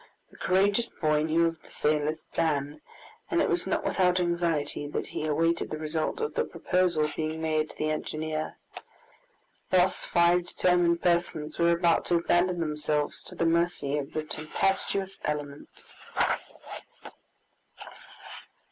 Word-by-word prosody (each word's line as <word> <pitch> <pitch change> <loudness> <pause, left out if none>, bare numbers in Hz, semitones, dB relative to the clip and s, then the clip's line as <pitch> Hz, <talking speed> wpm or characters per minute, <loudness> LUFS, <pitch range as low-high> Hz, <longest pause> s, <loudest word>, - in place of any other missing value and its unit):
The - - -17
courageous 200 +5 +2
boy 155 -2 +1
knew 160 +2 +2
of 165 -1 -2
the - - -18
sailor's 150 +1 0
plan, 150 -1 -1 0.5
and - - +1
it - - +3
was - - 0
not - - 0
without 180 -1 +2
anxiety 170 -5 -1
that 145 - -3
he 155 - -4
awaited 165 +3 +1
the 155 - -4
result 155 - -2
of 450 0 -2
the 475 - +1
proposal 180 - +1
being 160 0 -2
made 155 -1 0
to - - -13
the 155 0 0
engineer. 155 0 -3 1.1
Thus 185 0 +3
five 175 +1 +3
determined 175 -2 +2
persons 170 -3 0
were 170 0 +4
about 170 -1 +2
to 175 - +2
abandon 175 +1 +2
themselves 150 -1 -1
to - - -9
the 165 - 0
mercy 165 -4 +1
of 140 - -6
the 155 - -2
tempestuous 190 +5 -1
elements! 145 -1 -6
165 Hz, 140 wpm, -28 LUFS, 155-175 Hz, 1.1 s, were